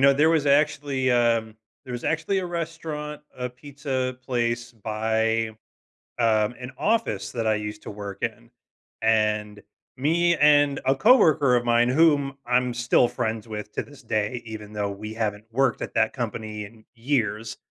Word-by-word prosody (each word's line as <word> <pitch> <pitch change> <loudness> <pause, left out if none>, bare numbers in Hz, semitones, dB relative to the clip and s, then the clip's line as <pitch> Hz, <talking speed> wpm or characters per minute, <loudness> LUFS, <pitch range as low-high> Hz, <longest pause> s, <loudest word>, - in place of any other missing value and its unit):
know, 140 0 +7
there 150 +4 +4
was 155 -3 +2
actually, 140 -2 +2
um, 115 -2 +2 0.3
there 125 - -7
was 120 - -5
actually 165 +5 0
a 185 - -2
restaurant, 160 -3 -5 0.2
a 125 -1 -3
pizza 130 -1 -4
place 120 -1 -1
by, 110 +1 0 0.7
um, 110 0 +2
an 125 +1 -7
office 215 - 0
that 115 -2 -2
I 110 - +3
used 105 0 -5
to - - -7
work 100 -1 -7
in, 115 +1 -4 0.5
and 105 -2 +1 0.4
me 170 +5 +2
and 145 -2 +4
a 135 +1 +3
coworker 155 - +5
of 120 0 +1
mine, 120 +1 +3
whom 145 -1 +3
I'm 125 0 +1
still 120 0 +3
friends 110 -1 -3
with 105 -1 -6
to - - -2
this 145 -2 -16
day, 110 +1 -1
even 105 -1 -8
though 105 -1 -2
we 105 +2 -7
haven't 105 -2 -2
worked 130 0 +1
at - - -5
that - - +2
company 110 -1 -4
in 110 +1 -16
years, 115 -3 -1
120 Hz, 165 wpm, -25 LUFS, 110-140 Hz, 0.7 s, know